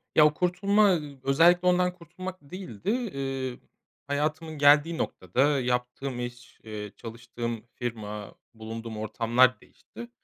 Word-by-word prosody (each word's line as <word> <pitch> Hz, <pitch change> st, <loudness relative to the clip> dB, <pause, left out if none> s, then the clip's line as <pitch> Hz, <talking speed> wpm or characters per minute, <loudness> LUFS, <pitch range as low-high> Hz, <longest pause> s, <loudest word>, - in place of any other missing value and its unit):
Ya, 155 Hz, -, +8 dB
o 150 Hz, -, +4 dB
kurtulma, 200 Hz, +5 st, +3 dB
ııı, 145 Hz, -5 st, -4 dB
özellikle 170 Hz, +6 st, +5 dB
ondan 180 Hz, 0 st, +3 dB
kurtulmak 180 Hz, +2 st, -8 dB
değildi. 140 Hz, -, -7 dB
Eee, 135 Hz, -, -3 dB, 0.5 s
hayatımın 155 Hz, +2 st, -2 dB
geldiği 145 Hz, +3 st, +5 dB
noktada 135 Hz, -, +1 dB
yaptığım 125 Hz, +1 st, -2 dB
iş, 120 Hz, 0 st, -7 dB
eee, 105 Hz, -2 st, -6 dB
çalıştığım 115 Hz, 0 st, -6 dB
firma, 105 Hz, -4 st, -5 dB, 0.2 s
bulunduğum 115 Hz, 0 st, -7 dB
ortamlar 120 Hz, +4 st, +3 dB
değişti. 235 Hz, 0 st, -12 dB
135 Hz, 115 wpm, -27 LUFS, 115-170 Hz, 0.5 s, Ya